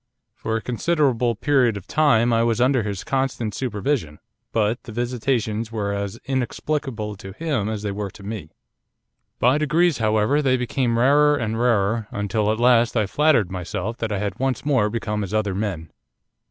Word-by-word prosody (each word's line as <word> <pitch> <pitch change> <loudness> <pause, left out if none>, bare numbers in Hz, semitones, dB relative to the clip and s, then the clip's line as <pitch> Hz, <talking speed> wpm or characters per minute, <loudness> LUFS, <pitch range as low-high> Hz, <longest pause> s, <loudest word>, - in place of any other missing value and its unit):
For 110 - -3
a 110 - -6
considerable 125 -2 +1
period 125 -3 +2
of 100 - -9
time 120 -5 +3
I 115 - +3
was 115 -1 +1
under 130 0 +3
his 100 -3 -4
constant 130 -5 -1
supervision, 105 - -2 0.3
but 110 +1 0
the - - -10
visitations 115 -2 -1
were 105 -3 -2
as 100 -1 -4
inexplicable 130 -3 -2
to 95 -1 -9
him 135 - -2
as 110 -1 -4
they 105 - -2
were 100 0 -4
to 100 - -14
me. 100 -6 -6 0.9
'By 130 +5 +3
degrees, 155 +1 +2
however, 110 +6 +2
they 130 -3 +2
became 125 -1 0
rarer 145 +4 +4
and 115 -4 -2
rarer, 110 -2 +1
until 105 +1 -1
at 110 - -2
last 120 -1 +4
I 110 - +2
flattered 130 - +2
myself 90 +5 -4
that 115 -2 -3
I 105 - 0
had 100 +1 -3
once 135 +1 -1
more 130 -8 +2
become 105 -2 -2
as 100 +2 -4
other 105 -2 0
men. 95 -5 -4
115 Hz, 175 wpm, -22 LUFS, 105-130 Hz, 0.9 s, rarer